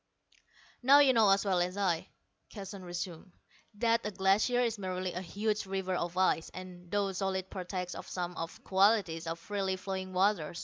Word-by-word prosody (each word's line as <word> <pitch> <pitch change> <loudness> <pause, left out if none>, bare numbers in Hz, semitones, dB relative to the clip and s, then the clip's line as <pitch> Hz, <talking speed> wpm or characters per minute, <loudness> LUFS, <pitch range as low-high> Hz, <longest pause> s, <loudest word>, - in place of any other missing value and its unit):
"Now, 270 +3 +7
you 280 -2 +6
know 220 -4 +5
as 195 +1 +3
well 190 -2 +2
as 180 +2 -2
I," 180 -5 0 0.4
Keston 195 -2 -8
resumed, 175 0 -6 0.4
"that 230 +1 +2
a 210 - -2
glacier 200 +5 +2
is 230 -3 0
merely 185 -1 -3
a 180 - -3
huge 210 +3 -2
river 190 -1 -2
of 175 0 -2
ice, 185 -3 +2
and, 180 -1 -10
though 200 0 0
solid, 190 0 -2
partakes 180 -1 -4
of - - -8
some 175 -1 -3
of 165 -1 -5
the - - -19
qualities 190 -4 +2
of 165 0 -2
freely 195 +2 -2
flowing 190 0 -5
water. 185 -4 +1
190 Hz, 180 wpm, -31 LUFS, 180-205 Hz, 0.4 s, Now